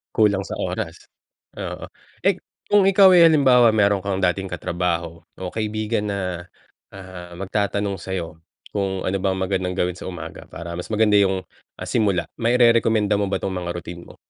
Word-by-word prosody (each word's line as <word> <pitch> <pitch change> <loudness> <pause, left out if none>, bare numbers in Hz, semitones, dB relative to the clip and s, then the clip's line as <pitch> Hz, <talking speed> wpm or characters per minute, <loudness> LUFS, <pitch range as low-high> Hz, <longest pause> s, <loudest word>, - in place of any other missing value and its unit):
Kulang 100 -3 +3
sa - - -6
oras, - - -5 0.5
oo. - - -6 0.3
Eh, - - +2 0.3
kung 205 -2 +5
ikaw 195 0 +7
ay 170 - +8
halimbawa, 130 -7 +5
meron 100 -2 +3
kang 95 -1 -1
dating 95 +1 +1
katrabaho, 85 -1 -3
o 90 -1 -6
kaibigan 110 0 -2
na, 90 -3 -3 0.5
ah, 90 -2 -10
magtatanong 100 +1 -2
sa'yo, 85 -3 -5 0.3
kung 95 -2 -2
ano 95 - 0
bang 95 0 0
magandang 95 -1 -1
gawin 90 -1 -1
sa - - -9
umaga, 90 -2 -8
para 85 0 -8
mas 90 - -5
maganda 105 -1 +4
yung, 95 -2 +2 0.4
ah, - - -5
simula, 95 -7 +1
mairerekomenda 115 -3 +3
mo 100 - 0
ba 100 - -2
'tong 95 - -2
mga 85 -1 -4
routine 85 0 -7
mo? - - -20
95 Hz, 165 wpm, -22 LUFS, 90-105 Hz, 0.5 s, ay